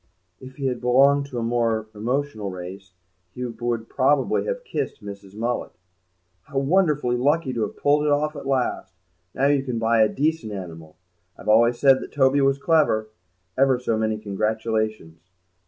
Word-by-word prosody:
If 130 0 -12
he 140 - -5
had 125 -2 -1
belonged 140 +3 +4
to 130 - -7
a 115 - -1
more 115 -2 0
emotional 115 -1 -2
race 95 +1 -9 0.4
he 125 - -4
would 115 -1 -3
probably 135 +1 +1
have - - -3
kissed 430 - -4
Mrs. 100 -1 -10
Mullet. 120 +3 -3 0.7
"How 140 -1 -7
wonderfully 150 -4 +2
lucky 145 +2 +1
to 115 - -2
have - - -3
pulled 145 +1 +2
it 150 - +2
off 150 +2 +1
at 135 - -7
last! 125 -8 -1 0.4
Now 135 - +1
you 140 -1 +3
can 125 -3 -4
buy 115 0 +2
a 110 - +5
decent 150 -6 -1
animal. 80 -5 -9 0.4
I've - - -6
always 115 +2 +5
said 135 0 +5
that - - -8
Toby 140 0 +3
was 135 0 +3
clever. 140 -8 +2 0.5
Ever 135 -1 +3
so 120 -2 -1
many 110 0 0
congratulations." 110 -4 -3
120 Hz, 170 wpm, -23 LUFS, 110-140 Hz, 0.7 s, a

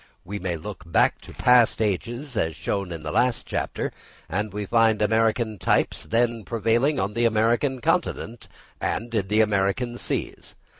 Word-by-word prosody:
We 100 +3 -5
may 90 -2 -2
look 75 - -8
back - - +3
to - - -12
past 125 -2 +4
ages, 120 +6 -2
as 80 -6 0
shown 100 +2 -3
in 80 -2 -6
the 75 - -4
last 120 +6 +1
chapter, - - -3 0.4
and 100 +4 -2
we 105 +1 -4
find 115 0 +3
American 110 0 +1
types - - +1
then 115 0 +1
prevailing 115 +7 +1
on 100 +2 -1
the 120 +2 +1
American 115 +4 +2
continent 165 -8 -1 0.3
and 115 +1 -2
in 105 -4 0
the 105 +2 +3
American 105 +4 0
seas. - - -4
110 Hz, 160 wpm, -24 LUFS, 100-120 Hz, 0.4 s, past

